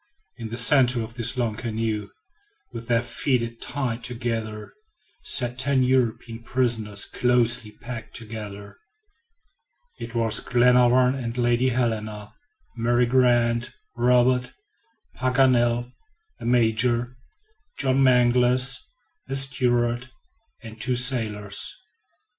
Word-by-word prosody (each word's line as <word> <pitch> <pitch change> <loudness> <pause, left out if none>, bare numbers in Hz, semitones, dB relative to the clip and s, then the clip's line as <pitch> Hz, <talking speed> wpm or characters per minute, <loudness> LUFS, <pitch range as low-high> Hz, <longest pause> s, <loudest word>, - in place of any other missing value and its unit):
In 115 -2 -7
the 115 - -3
center 125 -4 +5
of 110 +1 -9
this 120 +2 -2
long 120 -3 -1
canoe, 110 -2 -4 0.6
with 115 -1 -9
their 120 0 +1
feet 115 -2 -2
tied 125 -4 -3
together, 115 -3 -5 0.5
sat 125 0 +2
ten 130 0 +2
European 120 -2 -1
prisoners 115 -4 0
closely 120 -3 +1
packed 120 -1 -8
together. 105 -3 -9 1.2
It 115 +1 -8
was 115 -2 +3
Glenarvan 125 +1 +3
and 120 -3 -5
Lady 120 +1 +1
Helena, 110 -4 -3 0.4
Mary 120 +1 +1
Grant, 120 -1 +1 0.2
Robert, 125 +1 +2 0.6
Paganel, 125 -2 +1 0.5
the 115 - -9
Major, 120 +1 +1 0.6
John 135 -1 +1
Mangles, 125 0 +3 0.5
the 135 - -4
steward, 125 -3 0 0.5
and 110 -1 -10
the - - -23
two 125 +2 -1
sailors. 110 -6 0
120 Hz, 105 wpm, -24 LUFS, 115-125 Hz, 1.2 s, center